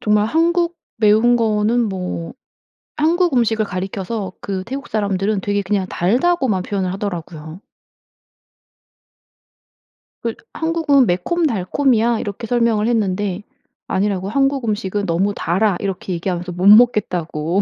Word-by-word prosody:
정말 210 0 +2
한국 340 +5 +1 0.2
매운 220 +3 +4
거는 225 +1 +1
뭐 180 -2 -5 0.6
한국 335 +1 +2
음식을 225 -2 +2
가리켜서 195 +1 -4
그 190 -2 -4
태국 270 +5 -6
사람들은 200 -1 -1
되게 205 +1 -1
그냥 195 -1 -1
달다고만 240 - +1
표현을 190 -2 -2
하더라고요. 175 -4 -6 2.6
그 230 -1 -2 0.2
"한국은 320 -5 +2
매콤달콤이야." 235 - +1
이렇게 205 +2 -5
설명을 230 -2 +1
했는데, 205 -3 -1 0.4
아니라고 195 -1 -1
"한국 275 +1 +1
음식은 205 -1 -2
너무 190 +4 0
달아." 190 +3 +1
이렇게 190 -1 -4
얘기하면서 180 +1 -3
못 180 +3 0
먹겠다고 190 -6 +3
210 Hz, 295 characters per minute, -19 LUFS, 185-240 Hz, 2.6 s, 매운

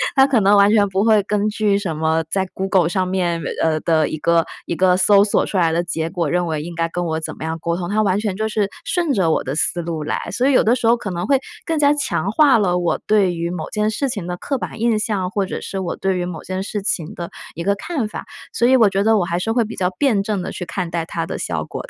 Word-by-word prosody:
它 270 -1 +7
可 270 -4 +2
能 205 0 +4
完 200 +1 +5
全 210 -2 +4
不 190 +1 0
会 215 -2 +4
根 210 0 0
据 210 -1 +1
什 185 -6 -3
么 160 +1 +1
在 190 -1 0
Google 190 -3 +1
上 185 0 0
面 180 -2 0 0.2
呃， 155 -1 +1
的 160 -2 +2
一 - - -4
个 165 +1 +2 0.2
一 170 - -3
个 185 +1 +3
搜 200 +2 +5
索 205 - +1
出 200 - -3
来 170 -3 +3
的 170 +2 0
结 165 -1 -3
果， 170 -2 -2
认 175 +3 0
为 155 -2 -2
应 170 +2 -7
该 165 0 -1
跟 175 +1 -3
我 160 -1 -1
怎 160 - -6
么 - - -7
样 160 +1 -3
沟 170 +1 -2
通， 175 -1 -4
它 210 +3 +1
完 200 -2 +1
全 210 -3 -2
就 220 +2 -2
是 210 -2 0 0.2
顺 345 -5 0
着 185 -8 +2
我 160 - +1
的 135 - -3
思 175 +2 0
路 165 -2 -4
来。 150 - -2
所 250 +8 +1
以 280 - +3
有 - - +5
的 230 +3 +3
时 245 -3 -1
候 235 +1 +5
可 205 -4 -5
能 175 +2 -3
会 275 0 +3 0.3
更 325 -1 -1
加 290 -1 +4
强 200 - -1
化 280 +2 +5
了 180 -4 +1
我 175 -1 0
对 200 -4 +2
于 170 +1 -3
某 180 - -5
件 210 0 0
事 270 +5 -1
情 205 -8 -4
的 180 0 -4
刻 275 +8 -3
板 225 - -6
印 230 -2 +2
象， 205 -4 -1
或 200 0 -1
者 - - -5
是 195 - -6
我 185 - -3
对 190 -1 -1
于 175 - -2
某 175 -3 -6
件 185 0 -4
事 205 +1 -4
情 170 -5 -2
的 170 -1 -6 0.2
一 170 - -5
个 200 +2 +1
看 260 - -3
法， 215 - -7 0.3
所 235 - +2
以 260 - +5
我 225 -5 +5
觉 195 0 0
得 220 +1 +4
我 175 - 0
还 170 0 -2
是 205 +5 -1
会 235 +1 +2
比 225 +1 -7
较 180 -1 0
辩 230 -9 +2
证 205 -2 -2
地 - - -5
去 180 - -6
看 175 0 -4
待 165 -1 -2
它 - - -4
的 - - -4
效 - - -3
果 - - -7
的。 - - -15
190 Hz, 325 characters per minute, -20 LUFS, 170-215 Hz, 0.3 s, 它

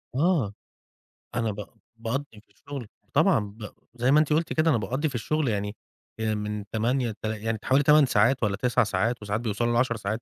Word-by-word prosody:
آه. 145 - +2 0.8
أنا 115 -2 0
ب 100 0 -7 0.3
باقضّي 125 +5 -2 0.2
في - - -44
الشغل 140 -6 -8 0.3
طبعًا - - +4
ب 105 +1 -7 0.2
زي 125 +2 +2
ما 150 - +6
أنتِ 150 0 +2
قلتِ 165 +2 +1
كده 160 +1 +3
أنا 125 - +4
باقضي 130 +9 -1
في 130 - -8
الشغل 150 +5 0
يعني 105 -1 -1 0.4
آآ، 110 -1 0
من 105 0 -4
08:00 120 +2 0
لتل 110 +1 -4
يعني 115 -1 -1
حوالي 135 +2 +3
8 150 0 +6
ساعات 120 +2 +3
والّا 100 -2 +1
9 125 +1 +2
ساعات 110 +4 0
وساعات 105 +2 -2
بيوصَلوا 120 +1 0
ل10 120 0 +2
ساعات، 110 +2 -3
115 Hz, 195 wpm, -26 LUFS, 105-135 Hz, 0.8 s, ما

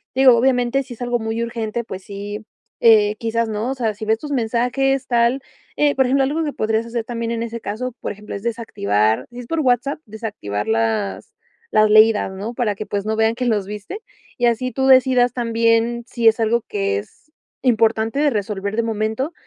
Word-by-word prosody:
Digo, 260 -1 +7
obviamente, 250 +1 +2
si 255 -1 -10
es 230 - -18
algo 245 0 0
muy 225 +1 -3
urgente, 235 0 -3
pues 190 -4 -8
sí, 205 +2 -7 0.4
eh, 215 -2 +5
quizás, 230 0 -1
¿no?, 220 +4 -2
o - - -3
sea, 230 -4 -1
sí 215 +2 -7
ves 220 +1 +1
tus 295 +2 -7
mensajes 250 +2 0
tal, 240 +2 +2 0.4
eh, 295 -1 +3
por 265 - +3
ejemplo, 270 +2 +2
algo 300 +5 0
que 295 - -3
podrías 220 +1 0
hacer 235 0 -3
también 230 -1 -3
en 230 0 -2
ese 230 0 -5
caso, 240 +5 -4
por - - -3
ejemplo, 210 0 -9
es 200 - -7
desactivar 110 - 0
si 240 - -9
es 245 - -9
por 330 -1 -1
WhatsApp 255 +2 +1
desactivar 205 - -5
las 110 -3 -1 0.4
las 215 0 +4
leídas, 215 -1 +5
¿no?, 205 +5 -5
para 230 -4 -1
que, 210 - -6
pues, 200 -1 -3
no 220 0 -1
vean 220 +1 +2
que 250 - -2
los 210 -5 0
viste, 210 - -7 0.4
y 240 - +1
así 250 +2 0
tú 265 +3 0
decidas 255 -2 +5
también, 230 0 +1
si 235 -2 0
es 225 - -2
algo 230 +1 +2
que 100 0 -1
es 205 - -15 0.3
importante 225 0 +2
de 295 0 +3
resolver 205 -3 -3
de - - +3
momento, 220 +7 -2
230 Hz, 205 wpm, -20 LUFS, 215-245 Hz, 0.4 s, Digo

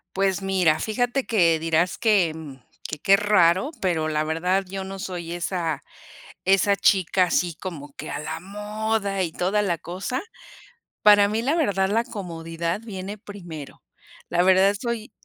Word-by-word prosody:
Pues 195 0 +1
mira, 185 -5 +2
fíjate 245 +4 -1
que, 170 -7 +3
dirás 165 +2 +1
que 195 -8 +3 0.5
que, 150 - -6
qué 195 +4 +5
raro, 195 - +3
pero 160 -4 0
la 155 0 0
verdad 180 +5 0
yo 195 0 -5
no 195 0 -7
soy 175 -3 -5
esa 170 -4 -2 0.7
esa 195 +1 +4
chica 190 -2 +3
así, 175 -1 0
como 150 -7 -7
que - - -7
a - - -3
la 155 +2 -5
moda 210 0 -2
y 170 -3 -2
toda 190 +5 0
la 180 -5 0
cosa, 190 +10 -4 0.8
para 205 -1 +7
mí, 215 +2 -1
la 275 +7 +1
verdad, 195 - +1
la 225 +3 +2
comodidad 170 -4 -4
viene 200 -2 -6
primero, 175 -8 -10 0.5
la 175 - +2
verdad 190 +2 +5
soy, 235 -2 -4
190 Hz, 155 wpm, -24 LUFS, 170-205 Hz, 0.8 s, para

